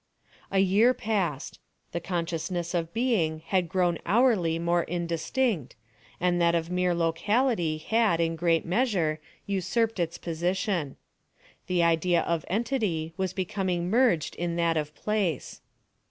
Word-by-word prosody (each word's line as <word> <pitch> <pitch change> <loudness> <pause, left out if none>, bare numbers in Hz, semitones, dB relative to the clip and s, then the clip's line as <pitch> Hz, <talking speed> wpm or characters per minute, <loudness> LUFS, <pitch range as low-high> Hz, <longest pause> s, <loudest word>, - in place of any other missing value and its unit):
A 195 - -1
year 200 +6 +4
passed. 190 - -2 0.3
The 170 - -2
consciousness 170 0 -3
of 165 -2 -1
being 180 -10 0
had 180 -1 0
grown 175 -2 +1
hourly 195 -5 +3
more 170 +1 +1
indistinct, 170 - -1 0.4
and 175 0 +1
that 170 0 +3
of 165 +1 -2
mere 180 -1 +1
locality 170 +1 +1
had, 220 0 +1
in 165 0 +1
great 165 0 +1
measure, 175 -6 +1 0.3
usurped 200 +3 0
its 170 -1 -1
position. 175 - -2 0.7
The 180 -2 +2
idea 170 +1 +3
of 170 -2 -1
entity 200 -7 -1
was 190 0 -1
becoming 185 -2 -2
merged 230 - +2
in 170 -1 -2
that 170 -1 +1
of 150 -1 -3
place. 200 -9 -2
175 Hz, 130 wpm, -27 LUFS, 165-200 Hz, 0.7 s, year